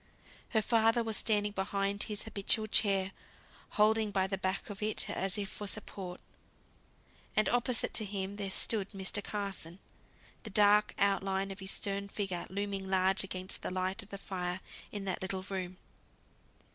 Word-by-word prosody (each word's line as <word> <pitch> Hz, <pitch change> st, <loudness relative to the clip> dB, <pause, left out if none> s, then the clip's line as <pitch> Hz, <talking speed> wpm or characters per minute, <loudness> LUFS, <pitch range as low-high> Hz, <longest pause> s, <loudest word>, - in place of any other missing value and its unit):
Her 220 Hz, -3 st, +2 dB
father 225 Hz, +1 st, +4 dB
was 225 Hz, -1 st, -2 dB
standing 210 Hz, -2 st, +2 dB
behind 200 Hz, 0 st, -1 dB
his 210 Hz, -2 st, -3 dB
habitual 215 Hz, +1 st, 0 dB
chair, 195 Hz, -3 st, +3 dB, 0.7 s
holding 215 Hz, 0 st, +4 dB
by 195 Hz, -2 st, +2 dB
the 190 Hz, 0 st, -2 dB
back 190 Hz, +2 st, -2 dB
of 205 Hz, -, -8 dB
it 215 Hz, 0 st, +1 dB
as 195 Hz, 0 st, -1 dB
if 200 Hz, -1 st, -1 dB
for 205 Hz, +1 st, -6 dB
support. 190 Hz, -3 st, -4 dB, 1.2 s
And 215 Hz, -, +4 dB
opposite 245 Hz, 0 st, +2 dB
to 215 Hz, -, +3 dB
him 195 Hz, 0 st, -3 dB
there 200 Hz, -2 st, -2 dB
stood 200 Hz, 0 st, +2 dB
Mr. 195 Hz, +1 st, 0 dB
Carson; 195 Hz, -5 st, -3 dB, 0.6 s
the 220 Hz, -, -6 dB
dark 210 Hz, +1 st, +5 dB
out 200 Hz, -1 st, +3 dB
line 195 Hz, 0 st, -1 dB
of 195 Hz, -, -7 dB
his 190 Hz, 0 st, -4 dB
stern 200 Hz, 0 st, 0 dB
figure 195 Hz, -3 st, -3 dB
looming 195 Hz, 0 st, -3 dB
large 190 Hz, 0 st, +3 dB
against 185 Hz, -1 st, -5 dB
the -, -, -2 dB
light 185 Hz, +3 st, -1 dB
of 205 Hz, -, -13 dB
the 200 Hz, -, -5 dB
fire 180 Hz, -2 st, -3 dB, 0.3 s
in 205 Hz, -2 st, -4 dB
that 190 Hz, -2 st, -2 dB
little 190 Hz, 0 st, -2 dB
room. 185 Hz, -2 st, -4 dB
200 Hz, 165 wpm, -33 LUFS, 190-210 Hz, 1.2 s, dark